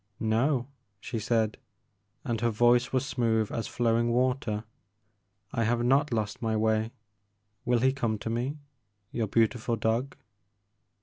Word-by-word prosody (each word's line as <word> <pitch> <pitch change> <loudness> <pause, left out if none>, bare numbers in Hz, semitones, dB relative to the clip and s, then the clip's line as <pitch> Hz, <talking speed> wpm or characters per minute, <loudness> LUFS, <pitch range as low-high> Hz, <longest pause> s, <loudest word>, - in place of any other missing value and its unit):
No,*' 120 +4 +1 0.3
she 115 +1 -4
said, 110 -1 0 0.3
— - - -47
and 115 -2 -1
her 120 - +2
voice 120 +2 +3
was 130 0 +1
smooth 110 -4 0
as 115 - -3
flowing 120 0 +1
water, 125 -3 0 0.4
'* 100 -1 -42
I 115 - +1
have 120 +1 +1
not 135 +3 +3
lost 110 -3 -2
my 110 -2 0
way. 110 +1 +1 0.7
Will 120 -1 +2
he 130 +1 +3
come 115 -5 -1
to 110 - -5
me, 125 +6 -2 0.5
your 115 -2 -1
beautiful 115 +2 +1
dog 115 +5 -1
115 Hz, 145 wpm, -28 LUFS, 110-125 Hz, 0.7 s, voice